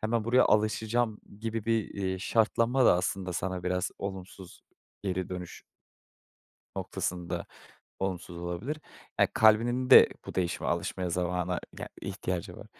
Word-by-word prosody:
hemen 110 0 0
buraya 125 +2 +5
alışacağım," 110 +1 +1 0.2
gibi 115 -1 -3
bir, 115 -2 +1
eee, 95 -2 -2
şartlanma 115 +5 +2
da - - +7
aslında 90 0 -2
sana 90 0 -2
biraz 90 0 0
olumsuz, 95 -1 -7 0.4
geri 95 -2 -2
dönüş 90 -1 -7 1.2
noktasında 90 -1 -3 0.6
olumsuz 90 -2 -3
olabilir. 90 - -4 0.4
Ya, - - +5
kalbinin 120 +4 +4
de - - +10 0.2
bu - - -7
değişime 90 -1 -1
alışmaya 85 +1 -1
zamana 90 0 -1 0.2
ya - - -6
ihtiyacı 95 -3 -4
var. - - -10
95 Hz, 125 wpm, -29 LUFS, 90-110 Hz, 1.2 s, de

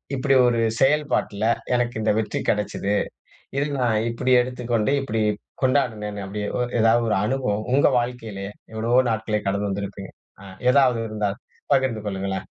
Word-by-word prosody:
இப்டி 135 +1 +2
ஒரு 120 -1 +2 0.2
செயல்பாட்ல, 140 -7 +1 0.3
எனக்கு 120 -1 0
இந்த 110 - +2
வெற்றி 110 - -2
கெடச்சது. 105 -1 0 0.6
இதை 140 - +1
நான் 120 -4 +2
இப்டி 125 +2 0
எடுத்துக்கொண்டு, 125 -1 -1
இப்டி 115 -5 -1 0.4
கொண்டாடினேன்னு 110 -7 0
அப்டி 100 +2 -5 0.4
எதாவது 115 +1 +4
ஒரு - - +2
அனுபவம் 110 -4 -1
உங்க 140 - +5
வாழ்க்கையிலே 115 -5 -5 0.3
எவ்வளவோ 115 +3 +2
நாட்களே 110 -1 -1
கடந்து 100 +1 0
வந்திருப்பீங்க, 100 0 -5 0.3
அ - - -12 0.3
எதாவது 130 -4 +4
இருந்தால் 105 0 -2 0.3
பகிர்ந்து 130 -5 +1
கொள்ளுங்களேன். 95 -1 -3
115 Hz, 135 wpm, -23 LUFS, 105-125 Hz, 0.6 s, உங்க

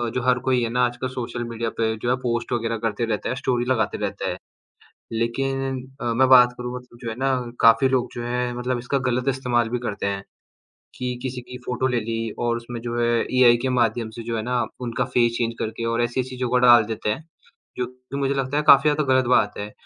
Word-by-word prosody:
जो 125 - 0
हर 125 0 +3
कोई 125 -1 +3
है 115 - -1
ना 125 +1 +2
आजकल 120 +1 -3
सोशल 120 -1 -4
मीडिया 115 0 -3
पे 110 -1 +1
जो 120 - 0
है 125 - +3
पोस्ट 120 0 -1
वगैरह 115 -1 -1
करते 110 +2 -2
रहते 105 -2 -2
है, 125 - -1
स्टोरी 125 -2 -1
लगाते 110 -5 0
रहते - - -3
है। - - -5 0.8
लेकिन 135 +3 -1 0.2
अ, 120 -1 0
मैं 130 +3 +4
बात 125 -1 +7
करूँ 125 0 -5
मतलब 125 -1 -11
जो 115 - -3
है 110 - -5
ना 135 0 +2 0.3
काफ़ी 115 +3 +6
लोग 130 -2 +1
जो 120 - -4
हैं 125 0 -1
मतलब 125 +1 -2
इसका 125 +3 -1
गलत 125 +2 -1
इस्तेमाल 125 -3 0
भी 125 - -2
करते 110 -5 -4
हैं, 100 0 -3 0.7
कि 125 -1 -3
किसी 130 -1 -4
की 125 +1 -10
फ़ोटो 125 +1 0
ले 125 -2 0
ली 115 0 -2 0.2
और 120 -1 0
उसमें 120 0 -7
जो 120 0 -3
है 120 - +2 0.3
एआई 120 -2 +7
के 130 - 0
माध्यम 115 -1 +1
से 115 - -6
जो 115 0 -2
है 110 - -2
ना 125 0 -1 0.2
उनका 125 0 -1
फेस 120 -1 +4
चेंज 115 -1 -1
करके 110 +1 -3
और 115 - +1
ऐसी 120 +2 0
चीज़ों 130 -1 -4
का 125 - +3
डाल 120 -2 +8
देते 110 -1 -2
हैं, 155 +9 -3 0.5
जो 125 - 0
कि 125 +2 -10
मुझे 140 0 0
लगता 135 +1 -1
है - - +1
काफ़ी 140 0 +9
ज़्यादा 150 0 0
गलत 130 - +3
बात 105 -3 +2
है 105 +1 -5
120 Hz, 235 wpm, -23 LUFS, 115-125 Hz, 0.8 s, काफ़ी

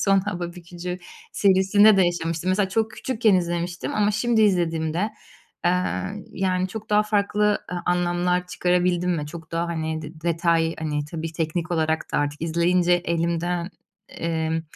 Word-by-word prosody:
son 195 -1 +4
hava 175 -3 -4
bükücü 180 +1 -7 0.3
serisinde 200 +2 +5
de 190 - +5
yaşamıştım. 165 0 -2
Mesela 190 0 +2
çok 220 +3 0
küçükken 225 -2 +1
izlemiştim 175 0 -1
ama 210 0 +2
şimdi 225 +1 +2
izlediğimde, 170 0 +1 0.5
eee, 180 +3 -1
yani, 185 -1 0
çok 220 +2 -8
daha 210 0 +5
farklı, 210 0 +1
eee, - - -2
anlamlar 180 0 +1
çıkarabildim 180 0 +1
mi? 150 -2 -3
Çok 160 +1 -10
daha, 165 +1 0
hani, 160 -1 -3
de 155 +1 -10
detay, 165 0 +1
hani, 150 -2 -2
tabii 160 +1 -5
teknik 165 +2 -2
olarak 160 -1 0
da - - +2
artık 145 +1 -2
izleyince, 175 +2 +2
elimden, 170 0 0 0.4
emm, 160 -1 -2
175 Hz, 145 wpm, -24 LUFS, 165-190 Hz, 0.5 s, serisinde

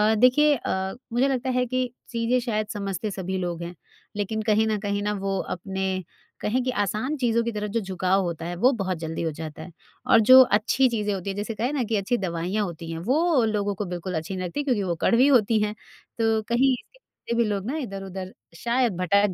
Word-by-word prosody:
देखिए 270 +6 +5
अ, 190 -5 -2 0.2
मुझे 250 +3 +3
लगता 260 -1 -1
है 250 0 +1
कि 255 0 -1 0.2
चीज़ें 235 +1 +1
शायद 215 -3 -2
समझते 200 0 -3
सभी 190 -1 -3
लोग 175 -2 -3
हैं, 175 +1 -7 0.4
लेकिन 210 +2 -2
कहीं 220 0 +2
ना 215 - +1
कहीं 200 0 -2
ना 210 - 0
वो 195 -1 -2 0.2
अपने 190 0 -3 0.4
कहें 245 +5 0
कि 255 - 0
आसान 215 +8 -1
चीज़ों 235 -3 +2
की 235 - -2
तरफ 210 -1 -3
जो 230 - +1
झुकाव 190 -1 0
होता 170 -2 -4
है, 175 +1 -4
वो 245 +9 +4
बहुत 185 -2 -1
जल्दी 160 0 -4
हो 165 -1 -1
जाता 155 -1 -6
है। 175 - -10 0.4
और 225 - +8
जो 260 0 +11
अच्छी 245 +3 +3
चीज़ें 210 -3 -1
होती 195 0 -4
हैं, 195 - -3
जैसे 210 +2 -3
कहें 240 +7 -1
ना 270 -4 0
कि 225 0 -1
अच्छी 210 +4 0
दवाइयाँ 185 +2 -1
होती 165 -2 -7
हैं, 165 - -4
वो 285 - +2
लोगों 205 -2 0
को 205 +2 -3
बिल्कुल 180 +1 -5
अच्छी 160 +5 -4
नहीं 185 - -3
लगतीं 235 +12 -3
क्योंकि 245 -8 +1
वो 175 -2 -1
कड़वी 245 +4 +4
होती 230 -5 +4
हैं, 210 0 0 0.4
तो 225 -1 +2
कहीं 255 +3 +4
इसके - - -9
पीछे 235 - -7
भी 235 - +3
लोग 200 -2 -2
ना 315 - -2
इधर-उधर 195 - -6 0.2
शायद 235 -1 +1
भटक 200 +2 +2
210 Hz, 220 wpm, -25 LUFS, 190-240 Hz, 0.4 s, जो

